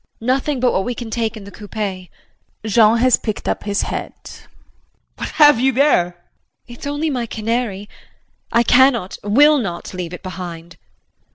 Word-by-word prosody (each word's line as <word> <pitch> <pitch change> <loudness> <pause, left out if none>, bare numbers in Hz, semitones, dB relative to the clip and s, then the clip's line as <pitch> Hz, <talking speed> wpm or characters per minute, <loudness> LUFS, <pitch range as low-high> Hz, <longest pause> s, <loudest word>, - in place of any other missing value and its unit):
JULIE. 225 - -11
Nothing 275 0 -2
but 250 0 +2
what 190 - +1
we 245 +2 -3
can 230 -2 -7
take 225 -1 -2
in 210 - -10
the 200 - -11
coupé. 200 -4 -6 0.6
[Jean 220 +1 +4
has 250 +1 +4
picked 215 -3 -5
up - - -2
his 205 -1 0
hat.] - - -7
JEAN. - - -36
What - - -4
have 295 -5 +7
you 265 +2 +3
there? 275 -7 +3
JULIE. 175 0 -11 0.6
It's 260 - -8
only 295 +2 -2
my 245 -3 -2
canary. 220 -2 -3 0.6
I 235 - +3
cannot, 245 -6 +3
will 290 +9 +5
not, 185 -7 -5
leave 180 -2 -5
it 180 - -9
behind. 175 -3 -7
JEAN. - - -25
225 Hz, 180 wpm, -19 LUFS, 195-255 Hz, 0.6 s, have